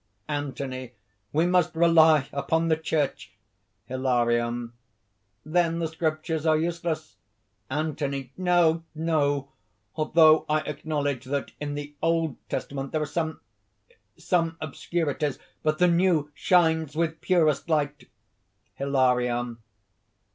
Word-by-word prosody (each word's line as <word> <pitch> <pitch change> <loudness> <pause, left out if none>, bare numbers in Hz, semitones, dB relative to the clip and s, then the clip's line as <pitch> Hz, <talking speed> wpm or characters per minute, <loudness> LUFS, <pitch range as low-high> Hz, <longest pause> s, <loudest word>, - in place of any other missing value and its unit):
ANTHONY. 135 -3 -4 0.4
"We 160 +3 +2
must 180 -2 +2
rely 160 -3 +5
upon 160 +4 0
the 160 - +4
Church!" 155 -3 -2 0.5
HILARION. 120 -2 0 0.7
"Then 165 +1 +1
the 165 -1 -1
Scriptures 160 0 -2
are 160 -1 +3
useless?" 170 0 -3 0.5
ANTHONY. 140 -2 -3
"No! 175 -3 +3
no! 145 -3 0 0.5
although 155 0 +5
I 155 0 +2
acknowledge 145 -3 -3
that 140 +1 -3
in 145 -1 -4
the 145 0 -6
Old 165 -2 +1
Testament 135 -1 -4
there 155 - 0
are - - -1
some... 160 +1 -3 0.8
some 165 -3 0
obscurities. 150 -1 -2 0.2
But 155 0 +1
the 180 - +4
New 170 -4 +2
shines 160 -3 +2
with 160 0 -1
purest 165 -4 +2
light." 150 -2 -1 0.7
HILARION. 125 -3 +1
155 Hz, 110 wpm, -26 LUFS, 140-165 Hz, 0.8 s, rely